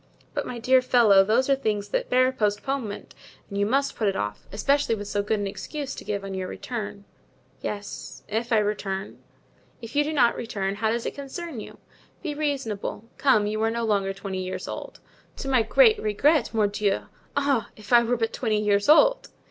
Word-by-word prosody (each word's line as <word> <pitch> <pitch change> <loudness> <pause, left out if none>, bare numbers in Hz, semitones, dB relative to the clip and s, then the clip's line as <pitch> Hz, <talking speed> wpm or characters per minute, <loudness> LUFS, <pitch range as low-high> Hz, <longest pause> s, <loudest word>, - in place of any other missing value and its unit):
"But, - - -2
my 245 - -5
dear 255 +2 +4
fellow, 230 -6 +5
those 230 +6 +2
are 275 - +4
things 210 -6 -2
that - - -1
bear 255 +1 +4
postponement 215 0 -2 0.3
and 200 - -4
you 205 - +2
must 275 +4 +1
put 220 - 0
it 195 - +1
off, 105 0 -4
especially 275 +3 +1
with 205 -1 -6
so 205 - 0
good 210 +1 0
an 205 - -2
excuse 275 +8 -5
to - - -8
give 200 -1 -3
on 195 0 -5
your 190 -1 -3
return——" 205 -4 -6 0.6
"Yes, 205 -1 -6
if 225 +3 -2
I 225 - +5
return." 205 -2 -2 0.6
"If 230 +2 -10
you 295 - +4
do 300 - -2
not 255 -6 +3
return, 200 -4 -3
how 220 +1 +1
does 235 +1 -1
it - - -2
concern 280 0 -6
you? - - -9 0.5
Be 310 -4 -2
reasonable. 270 -7 -3
Come, 240 -7 +4
you 215 +1 -2
are 225 - +2
no 235 +1 -2
longer 200 -3 +1
twenty 195 -1 -5
years 185 0 -5
old." - - -7 0.4
"To - - -5
my 260 -3 +4
great 440 - +5
regret, 265 +7 +2
mordieu! 210 -2 +1 0.4
Ah, 280 -5 +1
if 215 +2 -6
I 240 - +8
were 240 +1 0
but 225 0 -1
twenty 220 -4 0
years 205 +2 +1
old!" - - +5
225 Hz, 195 wpm, -25 LUFS, 205-260 Hz, 0.6 s, I